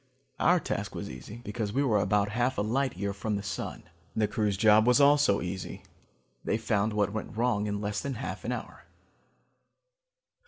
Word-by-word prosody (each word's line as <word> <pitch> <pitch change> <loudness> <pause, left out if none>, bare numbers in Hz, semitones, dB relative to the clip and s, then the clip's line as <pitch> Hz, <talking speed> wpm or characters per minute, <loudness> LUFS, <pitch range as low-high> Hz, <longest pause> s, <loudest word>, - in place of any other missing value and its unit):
Our - - +4
task - - -4
was - - -5
easy, 65 - -9
because 105 -1 -3
we 140 +3 +2
were 110 -6 +3
about 100 0 +2
half 120 +4 0
a 100 - +1
light 130 +2 0
year 100 +1 -2
from 105 +2 -2
the 100 - -3
sun. 95 -3 -5 0.3
The 110 -1 +2
crew's 105 -4 0
job 110 +2 +5
was 125 +3 +5
also 145 -7 +5
easy: 90 0 -5 0.6
they - - 0
found 110 -1 0
what 100 -1 +1
went 110 0 -5
wrong 115 -3 +1
in 105 0 -2
less 100 -1 -2
than 140 -2 -3
half 120 - -5
an - - -2
hour. - - -6
105 Hz, 185 wpm, -29 LUFS, 100-120 Hz, 0.6 s, job